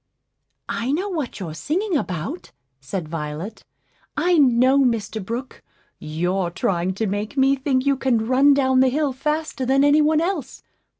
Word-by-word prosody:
"I 235 Hz, +3 st, -2 dB
know 370 Hz, +8 st, -1 dB
what 310 Hz, -, -4 dB
you're 170 Hz, -5 st, -5 dB
singing 335 Hz, -, -2 dB
about," 185 Hz, -, -4 dB, 0.3 s
said 155 Hz, +6 st, -5 dB
Violet; 155 Hz, +6 st, -6 dB, 0.5 s
"I 350 Hz, -2 st, +3 dB
know, 260 Hz, 0 st, +4 dB
Mr. 225 Hz, -5 st, 0 dB
Brook; 235 Hz, +6 st, -6 dB, 0.4 s
you're 175 Hz, +4 st, -1 dB
trying 180 Hz, 0 st, -1 dB
to 220 Hz, -, -1 dB
make 205 Hz, +6 st, -3 dB
me 270 Hz, +1 st, +4 dB
think 265 Hz, -1 st, 0 dB
you 280 Hz, -1 st, +2 dB
can 240 Hz, -4 st, +1 dB
run 270 Hz, +4 st, +4 dB
down 260 Hz, -2 st, +3 dB
the 260 Hz, 0 st, +5 dB
hill 285 Hz, +1 st, 0 dB
faster 300 Hz, +1 st, -2 dB
than 270 Hz, +2 st, +3 dB
any 290 Hz, +1 st, +5 dB
one 305 Hz, +1 st, +3 dB
else. 330 Hz, -6 st, -3 dB
260 Hz, 160 wpm, -22 LUFS, 195-285 Hz, 0.5 s, the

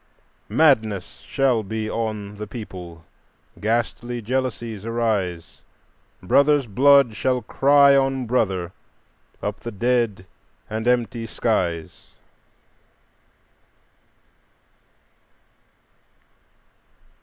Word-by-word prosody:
Madness 110 Hz, -, +2 dB
shall 130 Hz, -4 st, +1 dB
be 110 Hz, +1 st, -4 dB
on 105 Hz, -2 st, -4 dB
the 105 Hz, 0 st, -6 dB
people, 90 Hz, -7 st, -9 dB, 0.5 s
ghastly 120 Hz, +2 st, -2 dB
jealousies 120 Hz, -3 st, -3 dB
arise; 110 Hz, -7 st, -2 dB, 0.6 s
Brother's 140 Hz, +8 st, +3 dB
blood 135 Hz, +1 st, +4 dB
shall 125 Hz, +2 st, 0 dB
cry 140 Hz, +4 st, +5 dB
on 135 Hz, -1 st, +1 dB
brother 95 Hz, -7 st, 0 dB, 0.7 s
up 100 Hz, 0 st, -3 dB
the 120 Hz, -, -6 dB
dead 115 Hz, -3 st, 0 dB, 0.4 s
and 110 Hz, +2 st, -4 dB
empty 120 Hz, -1 st, 0 dB
skies." 85 Hz, -8 st, -2 dB
115 Hz, 75 wpm, -22 LUFS, 105-125 Hz, 0.7 s, cry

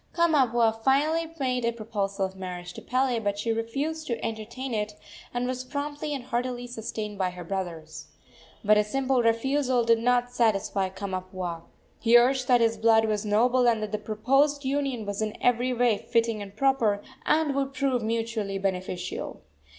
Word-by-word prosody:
Kamapuaa 240 Hz, -9 st, +3 dB
finally 310 Hz, +5 st, +2 dB
made 250 Hz, -2 st, 0 dB
a 235 Hz, -, +2 dB
proposal 205 Hz, -4 st, -2 dB
of 190 Hz, 0 st, -7 dB
marriage 180 Hz, -1 st, -6 dB
to -, -, -9 dB
Pele; 255 Hz, -1 st, +1 dB
but 205 Hz, -2 st, -1 dB
she 225 Hz, +3 st, -1 dB
refused 275 Hz, +8 st, -2 dB
to 235 Hz, -, -2 dB
entertain 230 Hz, +4 st, -5 dB
it, 210 Hz, -1 st, -2 dB, 0.4 s
and 245 Hz, 0 st, -1 dB
was 255 Hz, 0 st, -3 dB
promptly 290 Hz, +2 st, -4 dB
and 265 Hz, -, -5 dB
heartily 245 Hz, 0 st, -2 dB
sustained 220 Hz, -3 st, -5 dB
by 185 Hz, -1 st, +1 dB
her 180 Hz, 0 st, -8 dB
brothers. 165 Hz, -4 st, -5 dB, 0.6 s
But 210 Hz, +1 st, +6 dB
a -, -, +4 dB
simple 260 Hz, +3 st, +1 dB
refusal 250 Hz, +2 st, +2 dB
did 230 Hz, 0 st, +4 dB
not 245 Hz, +1 st, +2 dB
satisfy 200 Hz, -5 st, +1 dB
Kamapuaa. 185 Hz, -3 st, -5 dB, 0.3 s
He 235 Hz, 0 st, +6 dB
urged 255 Hz, +1 st, +3 dB
that 245 Hz, -2 st, +5 dB
his 225 Hz, -1 st, +2 dB
blood 220 Hz, 0 st, +4 dB
was 215 Hz, -1 st, -1 dB
noble, 245 Hz, +4 st, +3 dB
and 230 Hz, -2 st, +3 dB
that 210 Hz, -, -4 dB
the 215 Hz, -, -1 dB
proposed 270 Hz, +7 st, +1 dB
union 270 Hz, -4 st, -1 dB
was 205 Hz, +1 st, -3 dB
in 215 Hz, -1 st, -2 dB
every 245 Hz, +1 st, +2 dB
way 240 Hz, -3 st, +2 dB
fitting 230 Hz, -2 st, 0 dB
and 200 Hz, 0 st, -9 dB
proper, 230 Hz, -7 st, +2 dB, 0.2 s
and 310 Hz, -2 st, +3 dB
would 275 Hz, 0 st, -2 dB
prove 260 Hz, -2 st, +1 dB
mutually 225 Hz, -3 st, -2 dB
beneficial. 185 Hz, -2 st, -4 dB
230 Hz, 170 wpm, -27 LUFS, 205-255 Hz, 0.6 s, But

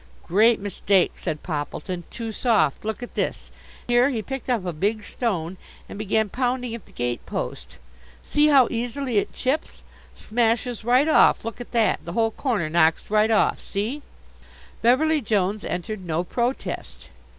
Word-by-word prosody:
"Great 220 Hz, +6 st, +4 dB
mistake," 195 Hz, -1 st, +2 dB
said 155 Hz, -, -4 dB
Poppleton. 175 Hz, +3 st, -4 dB
"Too 230 Hz, -1 st, -5 dB
soft. 210 Hz, -, +1 dB
Look 220 Hz, +3 st, -4 dB
at 245 Hz, -, -8 dB
this" -, -, -3 dB, 0.4 s
here 245 Hz, +2 st, +4 dB
he 230 Hz, -6 st, -2 dB
picked 270 Hz, +1 st, -6 dB
up 230 Hz, -7 st, 0 dB
a 175 Hz, -, -2 dB
big 205 Hz, +7 st, -1 dB
stone 190 Hz, -7 st, -3 dB, 0.3 s
and -, -, -9 dB
began 215 Hz, +1 st, +1 dB
pounding 250 Hz, +1 st, -1 dB
at 230 Hz, -4 st, -8 dB
the -, -, -16 dB
gate 120 Hz, -1 st, -3 dB
post -, -, -5 dB, 0.5 s
"see 295 Hz, +1 st, +3 dB
how 275 Hz, -5 st, +6 dB
easily 245 Hz, 0 st, -1 dB
it -, -, -3 dB
chips! 275 Hz, +5 st, -2 dB, 0.3 s
Smashes 230 Hz, +1 st, 0 dB
right 250 Hz, +5 st, +4 dB
off. 310 Hz, -, +5 dB
Look 230 Hz, +1 st, -5 dB
at 245 Hz, -, -9 dB
that, 230 Hz, -2 st, +2 dB
the 170 Hz, -, -6 dB
whole 225 Hz, +1 st, +2 dB
corner 220 Hz, -, -1 dB
knocks 160 Hz, +3 st, +2 dB
right 215 Hz, +1 st, +4 dB
off, 220 Hz, -, +2 dB
see!" 220 Hz, +9 st, -3 dB, 0.8 s
Beverly 300 Hz, +6 st, +3 dB
Jones 205 Hz, -2 st, 0 dB
entered 185 Hz, +3 st, -4 dB
no 170 Hz, 0 st, -1 dB
protest. 240 Hz, +7 st, -3 dB
220 Hz, 160 wpm, -24 LUFS, 190-245 Hz, 0.8 s, how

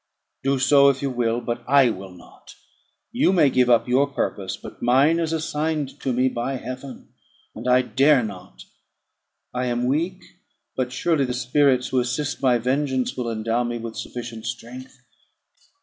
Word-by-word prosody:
"Do 135 Hz, 0 st, +1 dB
so, 140 Hz, +1 st, +5 dB
if 135 Hz, 0 st, -1 dB
you 135 Hz, -, -1 dB
will; 120 Hz, -1 st, 0 dB
but 120 Hz, 0 st, -4 dB
I 135 Hz, -2 st, +5 dB
will 95 Hz, -1 st, -8 dB
not. 90 Hz, -1 st, -16 dB, 0.6 s
You 240 Hz, -5 st, +2 dB
may 160 Hz, -7 st, +4 dB
give 125 Hz, -1 st, +3 dB
up 120 Hz, 0 st, +4 dB
your 130 Hz, +3 st, +3 dB
purpose, 100 Hz, -8 st, -3 dB
but -, -, -12 dB
mine 135 Hz, +7 st, +3 dB
is 165 Hz, -1 st, -1 dB
assigned 155 Hz, -2 st, -2 dB
to 135 Hz, -, -2 dB
me 125 Hz, +1 st, +2 dB
by 130 Hz, +2 st, -2 dB
Heaven, 130 Hz, +1 st, -8 dB, 0.4 s
and 115 Hz, +3 st, -7 dB
I 125 Hz, 0 st, +4 dB
dare 135 Hz, +1 st, +3 dB
not. 95 Hz, -3 st, -9 dB, 0.9 s
I 125 Hz, 0 st, -1 dB
am 120 Hz, 0 st, -1 dB
weak; 170 Hz, +8 st, -1 dB, 0.5 s
but 125 Hz, -1 st, -2 dB
surely 145 Hz, +2 st, +1 dB
the 125 Hz, -1 st, -3 dB
spirits 130 Hz, 0 st, +2 dB
who 130 Hz, -, +1 dB
assist 125 Hz, +4 st, -2 dB
my 125 Hz, -3 st, +3 dB
vengeance 130 Hz, +1 st, -1 dB
will 125 Hz, -2 st, -3 dB
endow 115 Hz, +2 st, -1 dB
me 120 Hz, 0 st, -3 dB
with 115 Hz, -1 st, -7 dB
sufficient 120 Hz, -2 st, -7 dB
strength." 125 Hz, +2 st, -8 dB
130 Hz, 165 wpm, -23 LUFS, 120-140 Hz, 0.9 s, so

